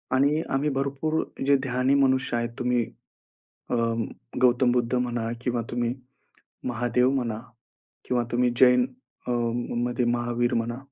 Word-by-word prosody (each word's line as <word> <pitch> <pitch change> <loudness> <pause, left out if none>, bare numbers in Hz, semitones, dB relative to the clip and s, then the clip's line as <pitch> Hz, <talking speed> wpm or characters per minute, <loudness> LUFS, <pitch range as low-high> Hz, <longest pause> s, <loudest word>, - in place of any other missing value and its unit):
आणि 145 +4 +3
आम्ही 140 +2 +1
भरपूर 140 +4 0 0.2
जे 140 +1 +5
ध्यानी 130 +1 +1
मनुष्य 130 -2 +2
आहेत 120 0 -1
तुम्ही 125 -1 +1 0.9
अ, - - +1 0.7
गौतम 125 0 +4
बुद्ध 125 0 0
म्हणा 120 -2 -1
किंवा 125 -2 0
तुम्ही 120 0 -1 0.7
महादेव 120 +1 +2
म्हणा 120 -5 -1 0.7
किंवा 120 -1 +1
तुम्ही 125 0 +3
जैन 125 -1 +6 0.4
अ, - - -2 0.5
मध्ये 120 0 0
महावीर 120 0 0
म्हणा. 115 +1 -1
125 Hz, 125 wpm, -26 LUFS, 120-130 Hz, 0.9 s, जैन